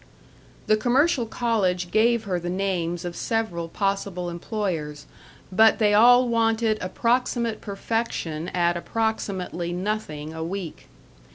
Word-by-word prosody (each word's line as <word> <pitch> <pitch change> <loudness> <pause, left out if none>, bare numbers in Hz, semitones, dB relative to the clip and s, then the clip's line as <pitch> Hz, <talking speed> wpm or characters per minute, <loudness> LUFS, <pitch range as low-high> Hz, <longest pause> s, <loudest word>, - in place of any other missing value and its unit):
The 215 - +3
commercial 255 +2 +2
college 190 -7 0
gave 230 +2 +3
her 185 -4 -2
the 175 0 -4
names 180 -2 -2
of 175 -1 -5
several 175 -8 -2
possible 195 -2 -2
employers, 170 -6 -4 0.5
but 220 +4 +5
they 210 -2 +3
all 245 +4 +6
wanted 225 -1 +1
approximate 235 +3 0
perfection 195 -6 -3
at 175 -1 +1
approximately 185 -4 -2
nothing 175 -6 -3
a 160 0 -5
week. 175 -1 -6
200 Hz, 115 wpm, -24 LUFS, 175-225 Hz, 0.5 s, all